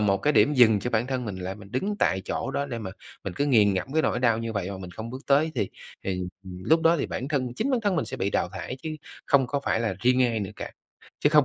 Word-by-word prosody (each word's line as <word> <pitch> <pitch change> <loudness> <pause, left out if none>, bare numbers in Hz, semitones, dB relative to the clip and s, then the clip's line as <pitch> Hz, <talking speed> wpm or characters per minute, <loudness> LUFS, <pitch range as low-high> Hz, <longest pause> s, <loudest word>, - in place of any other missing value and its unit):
một 100 -2 +3
cái 150 - +2
điểm 150 - +4
dừng 110 -5 +6
cho 125 - -2
bản 115 +1 +1
thân, 130 -2 -2
mình 100 -4 -4
lại 95 +1 -4
mình 100 -1 -13
đứng 200 +11 -1
tại 95 - +2
chỗ - - -2
đó 140 +1 -1
để 120 -4 -4
mà 105 -4 -5 0.3
mình 100 - -3
cứ 145 - 0
nghiền 105 -7 +5
ngẫm 105 +9 -3
cái 160 - +3
nỗi - - +1
đau 115 -3 +3
như 115 0 -3
vậy 100 -2 -2
mà 95 - -5
mình 90 -2 -8
không 110 +5 -7
bước 130 +2 -7
tới, 150 +3 +3
thì 100 - -1 0.3
thì, 95 -1 -1 0.2
ừm, 90 -1 -8
lúc 160 +1 +4
đó 165 +1 +5
thì - - -1
bản 130 - -4
thân, 130 -5 -1
chính 275 - -1
bản 250 -3 +2
thân 200 -5 +1
mình - - +1
sẽ - - -6
bị 100 +1 -1
đào - - +1
thải 125 - -5
chứ 160 - -3 0.4
không 135 -3 +4
có 140 +2 -1
phải 115 - +1
là 110 -5 0
riêng 125 +1 +4
ai 115 -2 0
nữa 100 - -3
cả, - - -6 0.5
chứ - - +5
không 150 -2 +6
120 Hz, 300 wpm, -26 LUFS, 100-140 Hz, 0.5 s, dừng